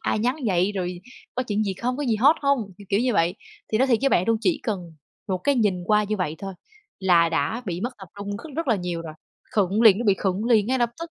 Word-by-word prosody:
ai - - 0
nhắn 245 +5 0
vậy, 185 +1 +2
rồi 180 -2 -4 0.3
có 255 - 0
chuyện 215 -3 -1
gì 195 -2 -2
không, 250 +5 -2
có 290 - -3
gì 230 -4 +1
hot 275 +9 +5
hông, 275 -8 0
kiểu, 200 - -13
kiểu 200 +1 +2
như 250 0 +1
vậy. 170 -3 +2 0.4
Thì 215 - +3
nói 265 - +4
thiệt 240 -4 +3
với 275 - +3
bạn 180 - +2
luôn, 225 - +4
chỉ 310 +1 +1
cần 180 -8 -4 0.4
một 185 -1 0
cái 285 +9 +1
nhìn 200 -7 +1
qua 210 +1 +3
như 215 +1 -2
vậy 180 -6 -2
thôi 195 -1 -6 0.5
là 175 -3 +4
đã 165 - -1
bị 175 0 -3
mất 245 - -2
tập 190 -3 -11
trung 200 0 -4
cất 300 +6 -10
rất 330 -3 -2
là 230 - +3
nhiều 175 -2 -4
rồi. 155 -2 -8 0.4
Khựng 205 +1 +2
liền, 210 -4 +7
nó 240 - -2
bị 200 -3 +4
khựng 195 +2 -1
liền 220 -4 +3
ngay 260 +1 +1
lập 240 -1 +1
tức. 335 0 -6
210 Hz, 275 wpm, -24 LUFS, 185-240 Hz, 0.5 s, liền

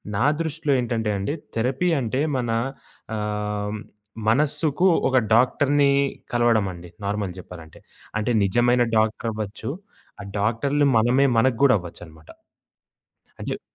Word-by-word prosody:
నా 115 - +1 0.2
దృష్టిలో 160 -2 -1
ఏంటంటే 115 -3 -1
అండి. 100 +9 -2 0.2
థెరపీ 130 +10 0
అంటే 130 +2 -1 0.2
మన 120 -2 -2 0.7
ఆహ్, 105 0 -3 0.5
మనసుకు 150 +6 +2 0.2
ఒక 130 - +2 0.2
డాక్టర్‌ని 140 +4 +3 0.4
కలవడం 120 -3 +3
అండి 90 0 -11 0.2
నార్మల్‌ 100 -3 -2
జెప్పాలంటే. 80 -3 -12 0.4
అంటే 110 +3 -1
నిజమైన 120 +5 +3
డాక్టర్ 110 +1 0
అవ్వొచ్చు. 105 +1 -5 0.5
ఆ - - -7 0.2
డాక్టరులు 135 +8 +1
మనమే 125 +5 +3
మనకు 120 +1 +3
కూడా 135 -2 +6
అవ్వొచ్చు 85 -1 -10
అన్నమాట. 80 -1 -18 1.1
అంచెప్పి - - -5
115 Hz, 120 wpm, -23 LUFS, 105-135 Hz, 1.1 s, కూడా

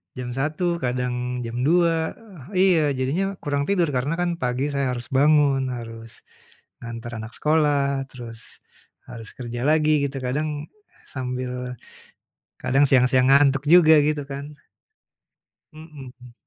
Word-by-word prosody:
Jam 125 -1 -5
1 155 +6 -1
kadang 125 0 -2
jam 115 +1 -5
2, 165 -1 +2 0.4
eee, 185 -3 +4
iya - - +2
jadinya 175 +10 -1
kurang 145 -1 -1
tidur 180 -6 +1
karena 130 +5 -1
kan 175 0 -1
pagi 130 +3 -1
saya 135 -2 -1
harus 120 +3 -8
bangun 140 -1 +3
harus, 115 -2 -8 0.6
nganter 115 0 -7
anak 110 +1 -7
sekolah 145 -3 +1
terus, 115 -3 -11 0.5
harus 115 -3 -9
kerja 120 0 -5
lagi 155 -1 +3
gitu 135 0 -5
kadang, 145 +3 -3 0.4
sambil, 125 -1 -4 0.9
kadang 135 +3 +2
siang-siang 130 0 +4
ngantuk 140 -1 +4
juga 160 -2 +7
gitu 150 -1 -1
kan. 140 +2 -8 1.2
Mhm. 135 -6 -13
135 Hz, 125 wpm, -23 LUFS, 125-150 Hz, 1.2 s, juga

